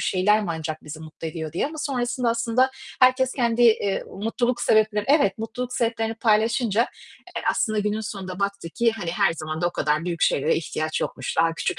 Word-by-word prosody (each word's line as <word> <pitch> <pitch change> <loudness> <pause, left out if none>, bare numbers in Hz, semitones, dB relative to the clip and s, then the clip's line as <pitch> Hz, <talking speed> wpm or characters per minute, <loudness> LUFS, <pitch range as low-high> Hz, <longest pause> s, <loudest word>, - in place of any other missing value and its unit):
şeyler 210 +3 +3
mi - - -4
ancak 155 -1 -5
bizi 155 +1 -8
mutlu 160 +1 -7
ediyor?" 160 -1 -6
diye 170 - 0
ama 310 +1 -8
sonrasında 245 -4 -1
aslında 235 +3 +2 0.3
herkes 255 0 +4
kendi, 240 -2 +1
eee, 215 -4 +3
mutluluk 240 +4 -2
sebepleri 215 -1 +3
Evet, 275 -10 +3
mutluluk 245 +3 -4
sebeplerini 225 -2 -1
paylaşınca, 225 0 +2 0.6
eee, - - -2
aslında 215 -1 0
günün 210 +1 0
sonunda 195 -3 -6
baktık 200 -4 -3
ki 235 -2 +2
hani 175 -7 -4
her 195 0 +2
zaman 155 0 -5
da 175 - +2
o - - -8
kadar 155 -1 0
büyük 170 -2 -3
şeylere 150 +3 +3
ihtiyaç 155 -1 -2
yokmuş. - - -4
Daha 165 0 +3
küçük - - -2
210 Hz, 190 wpm, -24 LUFS, 170-235 Hz, 0.6 s, herkes